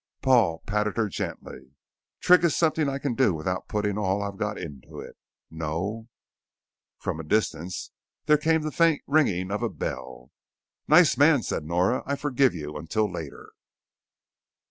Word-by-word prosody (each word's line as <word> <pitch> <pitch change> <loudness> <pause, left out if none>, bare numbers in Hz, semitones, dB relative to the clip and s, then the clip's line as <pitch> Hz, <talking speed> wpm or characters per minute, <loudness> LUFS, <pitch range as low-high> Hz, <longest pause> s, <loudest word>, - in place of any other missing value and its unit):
Paul 115 -11 +3
patted 105 +1 -1
her 115 -2 +1
gently. 70 -6 -7 0.5
"Trig 180 -1 +5
is 170 -4 +2
something 155 -3 +2
I 135 - -2
can 140 -2 -2
do 115 -8 +2
without 90 +4 -3
putting 105 -1 -1
all 100 0 0
I've 100 -1 -6
got 105 -1 -2
into 75 -7 -9
it. - - -10 0.4
No 85 +8 -4 0.5
" - - -67
From 80 - -3
a - - -5
distance 85 -1 -2 0.3
there 150 -1 +4
came 160 +1 +1
the 155 - -3
faint 165 -2 +2
ringing 100 - +1
of 105 - -2
a - - 0
bell. 65 -1 -6 0.6
"Nice - - +5
man," - - +5
said - - -3
Nora. 90 +9 +1
"I 140 - 0
forgive 135 -5 +1
you 75 -2 -6
until 105 +8 -1
later." 80 -5 -8
105 Hz, 160 wpm, -26 LUFS, 80-135 Hz, 0.6 s, Trig